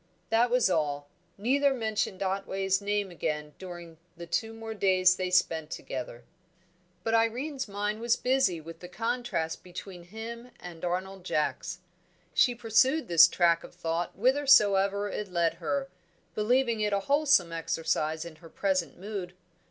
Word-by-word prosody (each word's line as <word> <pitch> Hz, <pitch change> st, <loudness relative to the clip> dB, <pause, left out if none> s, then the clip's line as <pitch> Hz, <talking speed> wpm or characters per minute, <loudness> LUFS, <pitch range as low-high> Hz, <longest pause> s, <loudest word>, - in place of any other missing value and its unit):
That 235 Hz, +2 st, +4 dB
was 250 Hz, 0 st, +3 dB
all. 145 Hz, -5 st, -1 dB, 0.3 s
Neither 270 Hz, +6 st, +2 dB
mentioned 220 Hz, -4 st, -2 dB
Otway's 195 Hz, 0 st, -1 dB
name 205 Hz, -1 st, -1 dB
again 150 Hz, -3 st, -3 dB
during 175 Hz, -3 st, -9 dB, 0.2 s
the 170 Hz, -, -7 dB
two 225 Hz, +7 st, -1 dB
more 225 Hz, 0 st, -7 dB
days 185 Hz, -3 st, +4 dB
they 185 Hz, -1 st, -2 dB
spent 165 Hz, -4 st, +1 dB
together. 125 Hz, -5 st, -6 dB, 0.8 s
But 225 Hz, -, -1 dB
Irene's 255 Hz, +5 st, 0 dB
mind 205 Hz, +1 st, -2 dB
was 235 Hz, 0 st, +2 dB
busy 250 Hz, -10 st, +1 dB
with 165 Hz, +1 st, -10 dB
the 180 Hz, -, -9 dB
contrast 230 Hz, -5 st, -2 dB
between 180 Hz, 0 st, -9 dB
him 230 Hz, +5 st, -8 dB
and 170 Hz, -2 st, -10 dB
Arnold 185 Hz, +2 st, -3 dB
Jacks. 180 Hz, +2 st, -2 dB, 0.5 s
She 245 Hz, -2 st, +4 dB
pursued 250 Hz, -, +2 dB
this 170 Hz, -1 st, +8 dB
track 170 Hz, -1 st, +2 dB
of -, -, -12 dB
thought 170 Hz, 0 st, -2 dB
whithersoever 205 Hz, -5 st, +4 dB
it 210 Hz, 0 st, -4 dB
led 170 Hz, -2 st, +2 dB
her, 275 Hz, -1 st, -1 dB, 0.5 s
believing 235 Hz, +1 st, +1 dB
it 210 Hz, -1 st, +1 dB
a 200 Hz, -, +1 dB
wholesome 280 Hz, -, +3 dB
exercise 165 Hz, -1 st, -1 dB
in 165 Hz, -2 st, -10 dB
her 165 Hz, 0 st, -14 dB
present 185 Hz, -1 st, -1 dB
mood. 190 Hz, -2 st, -6 dB
195 Hz, 145 wpm, -29 LUFS, 170-225 Hz, 0.8 s, this